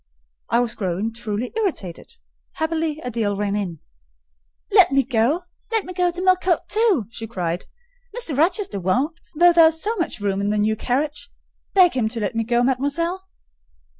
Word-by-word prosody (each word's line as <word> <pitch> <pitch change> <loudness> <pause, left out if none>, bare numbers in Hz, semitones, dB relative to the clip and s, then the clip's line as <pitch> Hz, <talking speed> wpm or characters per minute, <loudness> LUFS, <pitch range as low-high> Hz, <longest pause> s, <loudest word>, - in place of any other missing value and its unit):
I 235 - +3
was 240 -1 -2
growing 195 +3 -2
truly 230 0 -4
irritated: 340 - -3 0.4
happily, 320 -1 -2
Adèle 220 -4 -1
ran 205 0 -1
in. 180 -7 -4 0.9
"Let - - +6
me 275 0 +3
go,—let 340 - -1
me 365 - -7
go 360 -1 +2
to 350 +1 -4
Millcote 370 -1 +2
too!" 420 - +2
she 225 -1 -6
cried. 175 -5 -3 0.5
"Mr. 335 - -2
Rochester 340 - +1
won't: 255 - 0 0.2
though 345 +2 +6
there 335 -1 +7
is 320 0 -1
so 435 +7 -1
much 340 - -2
room 200 -1 -1
in 200 - 0
the 210 - 0
new 215 +1 +2
carriage. 285 +5 -2 0.5
Beg 365 -3 +6
him 240 -4 +1
to 230 +1 -4
let 210 +2 -2
me 230 0 0
go, 240 +1 +1
mademoiselle." 285 +9 -1
260 Hz, 165 wpm, -22 LUFS, 215-345 Hz, 0.9 s, there